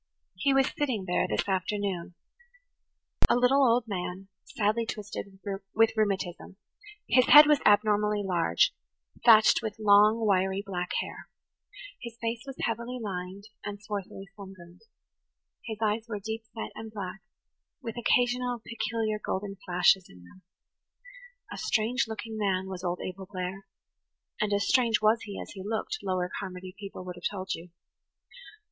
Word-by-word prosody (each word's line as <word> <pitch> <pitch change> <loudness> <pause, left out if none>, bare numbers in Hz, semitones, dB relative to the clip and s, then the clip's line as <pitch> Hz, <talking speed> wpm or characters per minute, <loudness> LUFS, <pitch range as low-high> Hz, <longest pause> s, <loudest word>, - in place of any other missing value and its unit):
He 280 - +2
was 270 -1 +3
sitting 250 -10 -1
there 180 0 +1
this - - -1
afternoon–a 200 - -4
little 250 +3 +4
old 240 -1 +4
man, 185 -1 -5 0.2
sadly 215 +1 0
twisted 200 -2 -6 0.4
with 225 +1 +5
rheumatism; 190 -4 -1 0.5
his 255 -1 +4
head 295 +1 +11
was 300 -1 +4
abnormally 210 0 +3
large, 175 -3 +2 0.5
thatched 220 -2 +7
with 220 -1 -4
long, 215 +1 +5
wiry 190 -1 +2
black 180 -2 -3
hair; - - -9 0.7
his 235 -1 -8
face 230 0 -2
was 270 - -6
heavily 235 +2 -2
lined 190 -2 -5 0.2
and 205 0 -5
swarthily 200 -2 -6
sunburned; 185 -3 -12 0.8
his 220 -2 -5
eyes 220 +2 0
were 210 -2 -3
deep 220 +2 -5
set 225 - -5
and 220 0 -8
black, 195 -3 -6 0.6
with 230 -3 -5
occasional 245 +1 +1
peculiar 225 -2 -2
golden 195 +1 -3
flashes 180 +1 +4
in 90 -1 -15
them. 135 - -17 1.1
A - - -7
strange 235 +4 +1
looking 220 0 -6
man 190 -2 0
was 185 -1 -6
old 175 0 -2
Abel 185 +1 -6
Blair; 190 +1 -5 0.7
and 215 -1 0
as 200 0 +1
strange 235 -4 +3
was 215 +1 +3
he 200 -2 -7
as - - -7
he 195 - -8
looked, 225 - -3
Lower 185 -2 -1
Carmody 185 -1 -7
people 195 -2 -8
would 180 -1 -7
have 175 - -2
told 190 -2 -4
you. 170 +2 -8
205 Hz, 145 wpm, -28 LUFS, 190-230 Hz, 1.1 s, head